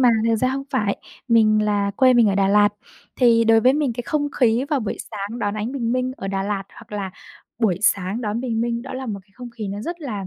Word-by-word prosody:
mà 250 - +6 0.2
thật 225 - +3
ra 255 +3 +1
hông 275 +1 -3
phải 210 -7 0 0.3
mình 215 -2 +4
là 205 -1 +1
quê 255 -1 +5
mình 235 -3 +5
ở 195 - +1
Đà 195 -1 +2
Lạt. 205 0 +5 0.5
Thì 235 -2 +4
đối 225 0 +5
với 255 +3 +5
mình 285 -4 0
cái 245 +1 -5
không 290 +2 -1
khí 240 +2 +3
vào 285 -3 +1
buổi 215 - -3
sáng 210 +2 -5
đón 205 -2 -1
ánh 215 +4 -3
bình 235 -4 -1
minh 255 0 -1
ở 195 - -5
Đà 195 0 -1
Lạt 200 -1 -2
hoặc 230 -3 -15
là 195 -2 -3 0.5
buổi 195 -7 +1
sáng 200 +3 +1
đón 215 +1 -2
bình 230 -3 -2
minh 235 0 -1
đó - - -8
là 260 0 -5
một 205 -3 -4
cái 195 - -33
không 245 -1 -9
khí 220 -4 -6
nó 200 +1 -5
rất 340 +8 -5
là, 210 -10 -5
225 Hz, 265 wpm, -22 LUFS, 205-250 Hz, 0.5 s, mà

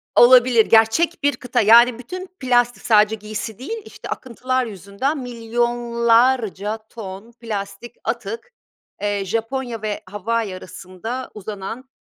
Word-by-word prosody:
Olabilir. 245 -2 +7
Gerçek 230 +10 +3
bir 285 -3 +3
kıta, 250 -2 0
yani, 235 +3 +6
bütün 365 +9 -7
plastik 245 -2 +1
sadece 215 -1 +4
giysi 215 +1 -6
değil, 440 - -5
işte, - - -11
akıntılar 255 +1 -2
yüzünden 205 - -3
milyonlarca 235 -2 +1
ton 205 +1 -9
plastik 220 0 -6
atık, 230 - -4 0.5
eee, 205 -1 -1
Japonya 230 +3 -3
ve 210 -1 -3
Hawaii 205 0 -2
arasında 185 +7 -7
uzanan, 215 +5 -7
230 Hz, 115 wpm, -21 LUFS, 210-245 Hz, 0.5 s, Olabilir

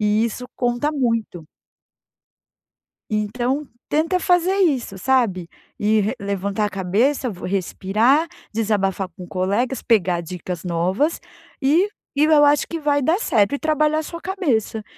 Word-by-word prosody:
e 210 +1 +2
isso 235 +2 -4
conta 245 +4 0
muito. 230 - -1 1.7
Então 240 +7 -1 0.2
tenta 330 +5 +1
fazer 360 +1 +3
isso, 265 - 0
sabe, 200 -7 +1 0.3
e 215 +1 +2
re 210 +3 0
levantar 200 +1 -2
a - - -1
cabeça, 215 +9 0 0.2
respirar, 200 - +1 0.3
desabafar 200 -4 0
com 180 - -9
colegas, 205 +8 -1
pegar 180 -7 +2
dicas 175 0 -6
novas 185 - 0 0.4
e 320 +9 +3 0.2
e 290 +2 +3
eu 305 -1 +5
acho 290 -1 +4
que 335 - -4
vai 290 -2 +1
dar 320 +7 +2
certo 215 - +2
e - - -5
trabalhar 310 0 +1
a - - -3
sua 335 +2 -7
cabeça 280 - -1
230 Hz, 135 wpm, -21 LUFS, 200-295 Hz, 1.7 s, eu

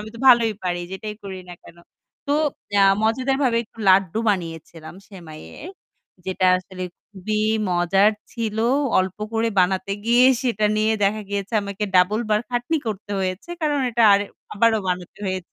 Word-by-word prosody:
আমি 215 - -8
তো - - -10
ভালোই 235 -3 +6
পারি 175 -1 -1
যেটাই 210 +2 -6
করি 195 -2 -7
না 175 - -8
কেন?" 170 - -16 0.5
তো 285 - 0 0.5
আ - - +6 0.2
মজাদারভাবে 255 +2 +1
একটু 225 - -26
লাড্ডু 190 +1 +4
বানিয়েছিলাম 165 -3 -6
সেমাইয়ের। 175 - -11 0.6
যেটা 185 0 0
আসলে 185 0 -9 0.3
খুবই 210 +1 -4 0.3
মজার 185 +4 +3 0.2
ছিল। 225 -3 -3 0.4
অল্প 185 0 -1 0.2
করে 225 0 +1
বানাতে 190 +2 +1
গিয়ে 240 +2 +4 0.2
সেটা 225 -4 0
নিয়ে 215 +1 +2
দেখা 210 +2 +1
গিয়েছে 200 +2 -4
আমাকে 200 +1 -4
double 190 +5 +3
বার 210 0 +3
খাটনি 245 +6 -1
করতে 210 -1 -5
হয়েছে। 185 - -4
কারণ 295 -2 0
এটা 235 0 +1
আরে 200 +1 +3 0.3
আবারও 220 +1 +3
বানাতে 180 -1 -4
হয়েছে। 185 -2 -4
205 Hz, 155 wpm, -22 LUFS, 185-225 Hz, 0.6 s, ভালোই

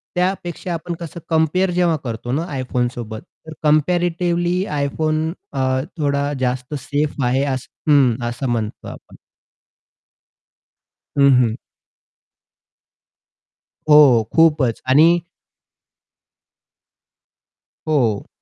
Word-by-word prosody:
त्यापेक्षा 180 -1 -2
आपण 170 +1 -4
कसं 170 0 -7
कंपेअर 160 +4 +2
जेव्हा 175 -2 +1
करतो 120 0 -5
ना 160 +5 -1
iPhoneसोबत, 120 -3 -3 0.3
तर 160 - -7
कंपॅरेटिव्हली 175 +3 +1
iPhone, 155 +3 -1 0.2
अ, 130 -1 0 0.2
थोडा 145 -1 0
जास्त 125 +2 -2
सेफ 145 +1 -2
आहे 130 +3 +1
हं, 135 -1 +1
असं 120 +2 -3
म्हणतो 110 -3 -3
आपण. - - -11 2.0
हं, 140 0 +6
हं. 115 -2 0 2.3
हो, 135 -7 +6
खूपच 150 -8 +3
आणि 160 +6 +5 2.7
हो. 120 -9 0
145 Hz, 85 wpm, -19 LUFS, 125-165 Hz, 2.7 s, हं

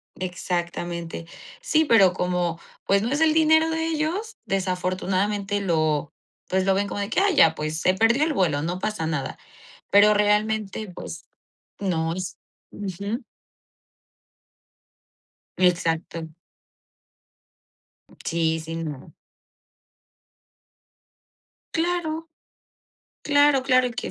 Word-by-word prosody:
Exactamente. 175 -2 -4 0.4
Sí, 320 -11 +2
pero 195 -8 +5
como, 180 -2 -1 0.3
pues, 195 0 +3
no 235 - -1
es 290 +3 0
el 315 -1 +5
dinero 315 0 +4
de 320 0 -1
ellos, 330 +8 -2
desafortunadamente 195 +2 -1
lo, 155 -5 0 0.4
pues, 190 0 +1
lo 195 - +3
ven 200 +1 0
como 205 - -4
de 200 +1 -2
que: - - +1
"Ay, 395 -3 +3
ya, 160 - +6
pues, 155 +1 -3
se 185 - +3
perdió 225 +8 +3
el 315 - +1
vuelo, 165 - +1
no 175 +2 -2
pasa 210 -5 -2
nada". 150 -4 -3 0.5
Pero 210 +1 +7
realmente, 210 -1 0
pues, - - -8 0.5
no 165 -4 -1
es 185 +2 -5 0.4
Ujú. 200 +5 -4 2.3
Exacto. 165 -2 0 2.0
Sí, 160 -1 0
sí, 160 +1 -6
no. 145 -4 -7 2.6
Claro. 325 -1 -1 0.9
Claro, 290 -2 +4
claro, 255 -1 +4
y 245 - -4
que 245 - -5
195 Hz, 110 wpm, -24 LUFS, 175-265 Hz, 2.6 s, Pero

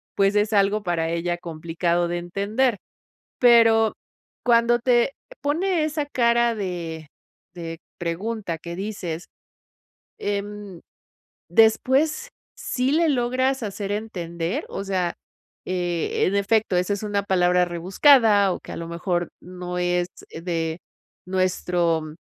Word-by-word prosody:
pues, 195 +1 +3
es 210 +1 +2
algo 200 +1 +2
para 165 -2 -1
ella, 175 +1 -2
complicado 170 +1 -1
de 175 0 -2
entender. 205 +7 0 0.6
Pero 225 -2 +6 0.5
cuando 240 0 +4
te 245 +2 +3 0.3
pone 325 +3 +1
esa 305 -1 -2
cara 235 -3 +2
de 170 -6 -5 0.5
de 165 -2 -6 0.2
pregunta 175 +1 -3
que 170 +1 -7
dices, 190 -5 -5 0.9
em, 205 -2 -4 0.7
¿después 265 - +3 0.3
sí 255 +2 -1
le 330 +1 +3
logras 260 0 +1
hacer 200 -1 -4
entender? 180 - -3
O 195 - -5
sea, 185 -3 -1 0.5
eh, 175 -2 -1
en 190 - 0
efecto, 200 -1 +2
esa 180 +3 +1
es 205 - -6
una 205 -1 -1
palabra 180 -2 +3
rebuscada 200 - +4
o - - -5
que, - - -10
a - - -6
lo 165 0 -6
mejor, 175 0 -2
no 180 0 -6
es 175 0 +1 0.2
de 165 -1 -3 0.5
nuestro 175 -4 0
195 Hz, 120 wpm, -23 LUFS, 175-230 Hz, 0.9 s, Pero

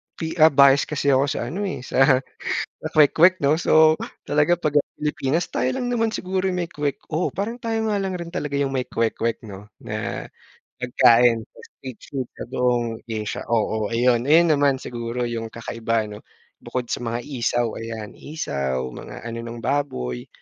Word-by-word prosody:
pi 160 -1 -4
ah, 155 - +9
bias 140 0 +6
kasi 145 -2 +1
ako 135 +1 +4
sa 120 -3 -2
ano, 200 +4 -3
eh, 125 - -5
sa 130 0 +4 0.6
sa - - -5
kwek-kwek, 165 +4 +6
'no. 145 +2 +5
So, 155 0 +6 0.3
talaga 150 +4 +3
pag 150 -3 +2
ang - - -9
Pilipinas 150 +2 -1
tayo 125 - 0
lang 245 - -2
naman 225 -2 +1
siguro 190 +1 -1
'yong 180 - -1
may - - -26
kwek 145 -1 -2
oh, 165 +4 +1
parang 225 +6 -4
tayo 225 -1 -1
nga 205 - +1
lang 190 -1 -2
rin 170 0 -6
talaga 145 -3 -3
yung 140 -1 0
may 130 -1 -1
kwek-kwek, 115 0 -1
'no, 100 0 -10 0.2
na - - -4 0.5
pagkain 120 -2 +4
na - - -21
street 130 -4 -10
food 130 -3 -2
sa - - -5
buong 120 -3 0
Asia. 110 -1 -3
Oo, 110 -2 0
ayun, 120 0 +3
ayun 165 0 +6
naman 140 -2 +3
siguro 120 0 -4
yung 115 -1 -4
kakaiba, 115 -1 -2
'no? 105 0 -9 0.4
Bukod 125 -2 -4
sa - - -3
mga 115 0 -2
isaw, 120 -3 0
ayan 110 -2 -6
isaw 70 - -3
mga - - -9
ano 115 0 -5
ng 115 0 -7
baboy. 65 - -2
130 Hz, 180 wpm, -23 LUFS, 115-155 Hz, 0.6 s, ah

